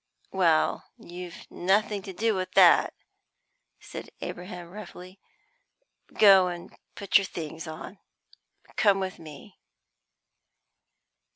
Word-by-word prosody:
"Well, 170 Hz, -5 st, +2 dB
you've 175 Hz, 0 st, -10 dB
nothing 200 Hz, +2 st, 0 dB
to 190 Hz, -, -8 dB
do 220 Hz, +4 st, 0 dB
with 185 Hz, -2 st, -4 dB
that," -, -, +5 dB, 0.8 s
said -, -, -9 dB
Abraham 180 Hz, -1 st, -8 dB
roughly. 185 Hz, -2 st, -11 dB, 0.9 s
"Go 195 Hz, -3 st, +6 dB
and 175 Hz, -1 st, -7 dB, 0.2 s
put 200 Hz, 0 st, +3 dB
your 200 Hz, -, -3 dB
things 160 Hz, -1 st, -7 dB
on, 160 Hz, +5 st, -9 dB, 0.7 s
and -, -, -23 dB
come 200 Hz, -3 st, +3 dB
with 190 Hz, -1 st, -4 dB
me." 160 Hz, +5 st, -13 dB
185 Hz, 105 wpm, -27 LUFS, 175-200 Hz, 0.9 s, Go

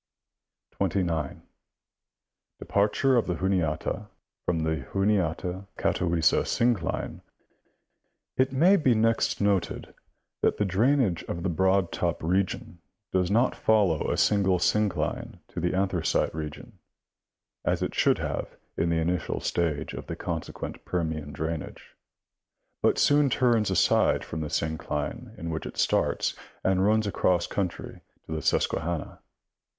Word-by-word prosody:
29. 85 Hz, -7 st, -1 dB, 1.1 s
Departure 105 Hz, +6 st, +2 dB
of 115 Hz, -, +1 dB
the 90 Hz, -, 0 dB
Juniata 95 Hz, +2 st, -1 dB, 0.4 s
from 85 Hz, -2 st, +1 dB
the 80 Hz, 0 st, 0 dB
Juniata 95 Hz, -1 st, 0 dB
Gatawissa 85 Hz, -2 st, +2 dB
syii 120 Hz, +1 st, +2 dB
cline. 85 Hz, -5 st, -4 dB, 0.6 s
— -, -, -52 dB
It 130 Hz, -, -6 dB
may 175 Hz, +9 st, +5 dB
be 130 Hz, -8 st, +3 dB
next 115 Hz, +1 st, +2 dB
noted 100 Hz, -3 st, 0 dB, 0.5 s
that -, -, +2 dB
the 105 Hz, -, +1 dB
drainage 110 Hz, -, +2 dB
of 85 Hz, -, -4 dB
the 95 Hz, -, 0 dB
Broad 95 Hz, +1 st, +2 dB
Top 85 Hz, -2 st, -2 dB
region 90 Hz, 0 st, -1 dB, 0.3 s
does 90 Hz, -1 st, +2 dB
not 115 Hz, +5 st, +2 dB
follow 100 Hz, -8 st, +2 dB
a -, -, 0 dB
single 95 Hz, -3 st, +3 dB
syncline 100 Hz, +1 st, 0 dB
to -, -, -5 dB
the 90 Hz, +2 st, 0 dB
Anthracite 95 Hz, -4 st, +1 dB
region, 75 Hz, -1 st, -7 dB, 0.8 s
as -, -, 0 dB
it -, -, -2 dB
should -, -, +3 dB
have -, -, -4 dB, 0.2 s
in 85 Hz, -, 0 dB
the 85 Hz, -, +1 dB
initial 85 Hz, 0 st, -1 dB
stage 80 Hz, -3 st, -1 dB
of -, -, -7 dB
the -, -, -4 dB
consequent -, -, -5 dB
Permian 80 Hz, -4 st, -2 dB
drainage, 80 Hz, +2 st, -5 dB, 0.9 s
but -, -, +3 dB
soon 145 Hz, -1 st, +4 dB
turns 120 Hz, -5 st, +2 dB
aside 95 Hz, -2 st, +3 dB
from 80 Hz, -, -5 dB
the 75 Hz, -, -3 dB
syncline 80 Hz, -, -3 dB
in 85 Hz, -4 st, -4 dB
which 80 Hz, -, -4 dB
it -, -, -9 dB
starts -, -, +1 dB, 0.3 s
and 95 Hz, 0 st, +2 dB
runs 110 Hz, +2 st, +3 dB
across 90 Hz, -3 st, +1 dB
country 95 Hz, -4 st, -4 dB, 0.2 s
to -, -, -11 dB
the 80 Hz, 0 st, -2 dB
Susquehanna. 85 Hz, -1 st, -1 dB
90 Hz, 135 wpm, -27 LUFS, 80-105 Hz, 1.1 s, may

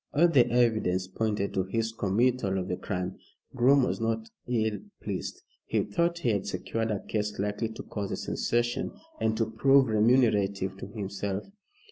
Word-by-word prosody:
All 170 Hz, +4 st, +6 dB
the 130 Hz, -8 st, +4 dB
evidence 110 Hz, -7 st, +2 dB
pointed 105 Hz, 0 st, -1 dB
to 95 Hz, -, +1 dB
his 110 Hz, +4 st, -1 dB
committal 115 Hz, 0 st, +1 dB
of 90 Hz, -1 st, -2 dB
the 90 Hz, -, 0 dB
crime. 90 Hz, -1 st, -4 dB, 0.4 s
Groom 130 Hz, +2 st, +5 dB
was 125 Hz, -, -1 dB
not 115 Hz, 0 st, -1 dB, 0.2 s
ill 110 Hz, -4 st, 0 dB, 0.2 s
pleased. -, -, -5 dB, 0.2 s
He -, -, +1 dB
thought 170 Hz, +11 st, 0 dB
he 150 Hz, -8 st, 0 dB
had 100 Hz, -3 st, 0 dB
secured 110 Hz, +5 st, -2 dB
a 105 Hz, -3 st, -1 dB
case 105 Hz, -1 st, -2 dB
likely 105 Hz, +3 st, -1 dB
to 110 Hz, -, -8 dB
cause 100 Hz, -2 st, -4 dB
a -, -, -2 dB
sensation, 120 Hz, 0 st, -1 dB, 0.3 s
and 110 Hz, 0 st, +1 dB
to 115 Hz, -, +2 dB
prove 135 Hz, +3 st, +4 dB
remunerative 105 Hz, -4 st, +3 dB
to 95 Hz, -, -7 dB
himself. 100 Hz, -1 st, -4 dB
110 Hz, 165 wpm, -28 LUFS, 100-120 Hz, 0.4 s, All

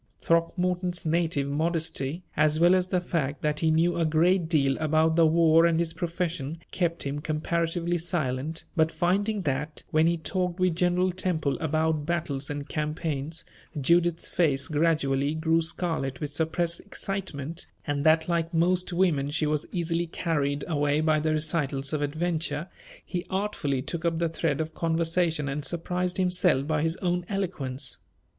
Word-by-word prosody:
Throckmorton's 180 Hz, +1 st, 0 dB
native 160 Hz, -3 st, +1 dB
modesty, 160 Hz, +1 st, -1 dB
as 155 Hz, 0 st, +3 dB
well 175 Hz, +2 st, +6 dB
as 185 Hz, -1 st, +2 dB
the 185 Hz, -1 st, +1 dB
fact 150 Hz, -6 st, -2 dB
that 150 Hz, 0 st, +1 dB
he 160 Hz, -, +2 dB
knew 165 Hz, +3 st, +2 dB
a -, -, +2 dB
great 165 Hz, +2 st, +2 dB
deal 140 Hz, -5 st, +2 dB
about 160 Hz, +1 st, +2 dB
the 165 Hz, -1 st, +5 dB
war 165 Hz, 0 st, +5 dB
and 165 Hz, -1 st, +2 dB
his 165 Hz, -1 st, 0 dB
profession, 170 Hz, -3 st, -3 dB
kept 170 Hz, -2 st, 0 dB
him 140 Hz, +1 st, -3 dB
comparatively 165 Hz, +3 st, -1 dB
silent; 155 Hz, -2 st, -2 dB
but 160 Hz, -1 st, +3 dB
finding 195 Hz, +5 st, 0 dB
that, 150 Hz, +1 st, -2 dB
when 155 Hz, +1 st, +4 dB
he 170 Hz, 0 st, +2 dB
talked 180 Hz, +2 st, -2 dB
with 185 Hz, -2 st, +2 dB
General 180 Hz, +1 st, +2 dB
Temple 175 Hz, -6 st, 0 dB
about 160 Hz, -1 st, 0 dB
battles 155 Hz, -5 st, -1 dB
and 145 Hz, -1 st, -4 dB
campaigns, 150 Hz, 0 st, -3 dB, 0.3 s
Judith's 170 Hz, +3 st, +2 dB
face 145 Hz, -6 st, +1 dB
gradually 145 Hz, -2 st, +1 dB
grew 160 Hz, +1 st, +2 dB
scarlet 160 Hz, -5 st, -2 dB
with 150 Hz, -1 st, -4 dB
suppressed 165 Hz, +2 st, 0 dB
excitement, 175 Hz, -6 st, -4 dB, 0.2 s
and 145 Hz, -1 st, -1 dB
that 160 Hz, +1 st, +4 dB
like 170 Hz, -1 st, 0 dB
most 180 Hz, +2 st, +2 dB
women 170 Hz, -6 st, +1 dB
she 150 Hz, +1 st, 0 dB
was 150 Hz, 0 st, -1 dB
easily 170 Hz, -1 st, -1 dB
carried 145 Hz, -4 st, -1 dB
away 145 Hz, -2 st, +1 dB
by 155 Hz, -1 st, +2 dB
the 155 Hz, +1 st, 0 dB
recitals 150 Hz, -3 st, -1 dB
of 150 Hz, -, 0 dB
adventure, 155 Hz, 0 st, -1 dB, 0.4 s
he 175 Hz, -1 st, -3 dB
artfully 185 Hz, -9 st, -1 dB
took 170 Hz, +3 st, -4 dB
up 170 Hz, -1 st, +1 dB
the 170 Hz, 0 st, 0 dB
thread 165 Hz, 0 st, -1 dB
of 160 Hz, 0 st, -4 dB
conversation 165 Hz, -1 st, 0 dB
and 145 Hz, +2 st, -3 dB
surprised 180 Hz, +3 st, -2 dB
himself 180 Hz, -6 st, +2 dB
by 155 Hz, 0 st, 0 dB
his 165 Hz, +2 st, 0 dB
own 180 Hz, 0 st, +1 dB
eloquence. 145 Hz, -9 st, -3 dB
160 Hz, 160 wpm, -27 LUFS, 150-175 Hz, 0.4 s, well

